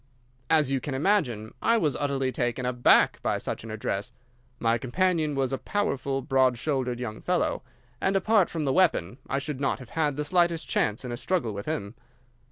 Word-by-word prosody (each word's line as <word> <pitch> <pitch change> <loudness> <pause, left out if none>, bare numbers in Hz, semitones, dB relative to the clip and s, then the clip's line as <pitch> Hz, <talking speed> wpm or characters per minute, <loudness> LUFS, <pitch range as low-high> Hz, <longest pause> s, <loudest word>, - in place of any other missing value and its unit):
"As 155 -4 +3
you 135 - +1
can 140 0 -4
imagine, 130 - 0
I 230 +1 +3
was 155 -9 +1
utterly 135 -2 -1
taken 120 0 -2
aback 125 -1 +4
by - - 0
such - - -4
an 115 - -8
address. 105 -2 -3 0.5
My 115 0 +1
companion 155 +3 0
was 135 -1 0
a 135 - -1
powerful, 140 -10 -1
broad 130 -2 +3
shouldered 130 -3 -1
young 110 -3 -5
fellow, 180 -1 0 0.4
and, 190 - +1
apart 200 0 +3
from 160 -3 -3
the 135 - +1
weapon, 130 - +2
I 135 - 0
should 140 -1 -4
not 135 - +1
have 130 -2 -12
had 150 -3 0
the 150 - -2
slightest 170 -1 +1
chance 110 +4 0
in 125 - -4
a 120 - -4
struggle 135 - -1
with 100 0 -6
him. 105 -10 -3
135 Hz, 190 wpm, -27 LUFS, 120-160 Hz, 0.5 s, aback